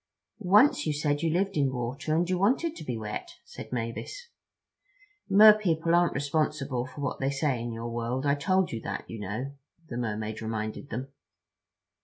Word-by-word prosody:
"Once 210 - +5
you 155 - +1
said 145 0 0
you 165 - +1
lived 195 +4 0
in 140 -3 +2
water, 130 +5 -2
and 170 +2 +2
you 185 - +1
wanted 260 - +1
to - - -8
be 125 -5 -3
wet," 105 -1 -6
said - - -10
Mavis. 125 - -5 1.0
"Mer 210 +2 +9
people 170 -5 0
aren't 175 0 +3
responsible 140 -3 -1
for 130 +3 -9
what 140 - -2
they 135 - 0
say 135 -3 0
in 120 0 -4
your 115 +1 -5
world. 120 +3 -2
I 140 - +4
told 185 +6 +1
you 115 - -4
that, - - -5
you 115 - -7
know," 110 +8 -4 0.4
the 120 - -4
Mermaid 110 -2 -3
reminded 110 +4 -4
them. 130 +4 -4
140 Hz, 180 wpm, -28 LUFS, 120-170 Hz, 1.0 s, Mer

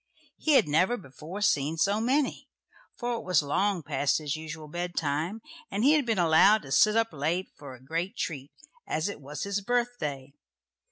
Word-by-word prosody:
He 310 - +2
had 270 - +5
never 185 +11 +2
before 160 - -9
seen 150 -4 +1
so 200 +6 +2
many, 265 +4 0 0.5
for 240 -1 -2
it - - -7
was 180 -5 +2
long 190 +5 0
past 145 0 +1
his 150 -3 -3
usual 155 0 -7
bed 175 +3 -4
time, 160 +9 -2 0.3
and 200 +3 -2
he 280 - +6
had 300 -5 +2
been 225 -3 +1
allowed 180 +5 +5
to 135 - -10
sit 210 +10 +5
up 225 -4 +1
late 160 +6 -1
for 140 -3 -10
a - - -16
great 170 - -3
treat, 140 -4 -4 0.4
as 155 +3 -1
it 200 - -8
was 145 +1 -6
his 200 0 -2
birthday. 195 - -2
175 Hz, 185 wpm, -28 LUFS, 150-215 Hz, 0.5 s, he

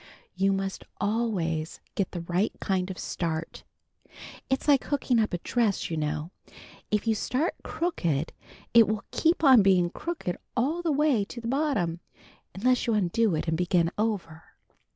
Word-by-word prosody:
You 195 +1 +2
must 195 0 -2 0.2
always 195 -8 -1
get 195 - -1
the 175 - -5
right 175 +5 0
kind 190 -2 -1
of 185 - -6
start. 165 -1 -4 0.9
It's 265 +2 -1
like 280 -3 +4
hooking 260 -4 +1
up 215 - +1
a 175 - -1
dress, 210 0 0
you - - -1
know. 155 +2 -2 0.6
If 210 0 0
you 225 - +3
start 255 - -1
crooked 170 - -1 0.4
it 230 -3 +7
will 215 -1 -2
keep 330 0 +1
on 260 -6 +8
being 185 -3 +3
crooked 320 - -4 0.2
all 295 +8 +1
the 335 -2 0
way 295 -2 +3
down 200 - 0
to 235 - -8
the 230 - -5
bottom, 255 - 0 0.6
unless 250 +5 +2
you 230 - +2
undo 210 0 +2
it 155 - -3
and 160 - +1
begin 175 0 +2
over. 195 -8 -2
205 Hz, 165 wpm, -27 LUFS, 175-250 Hz, 0.9 s, on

